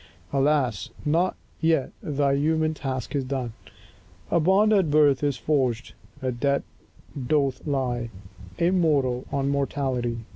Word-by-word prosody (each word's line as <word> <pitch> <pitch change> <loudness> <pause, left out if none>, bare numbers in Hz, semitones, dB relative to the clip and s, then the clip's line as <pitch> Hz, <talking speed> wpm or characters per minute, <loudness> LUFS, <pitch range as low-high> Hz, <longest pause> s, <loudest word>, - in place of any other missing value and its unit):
Alas, 135 -7 +1 0.2
not 170 +5 +2 0.2
yet 160 -4 +2
thy 145 -7 +1
human 155 +2 +1
task 135 -4 -4
is 140 - 0
done! 130 -3 -3 0.8
A - - +4
bond 195 +6 +4
at 190 -6 +3
birth 145 -2 +4
is 140 -3 +1
forged; 130 -6 0 0.3
a 130 - 0
debt 140 +3 0 0.6
doth 140 -2 0
lie 125 -4 -1 0.5
Immortal 155 -8 +2
on 140 0 0
mortality. 130 -5 -1
140 Hz, 120 wpm, -25 LUFS, 130-155 Hz, 0.8 s, A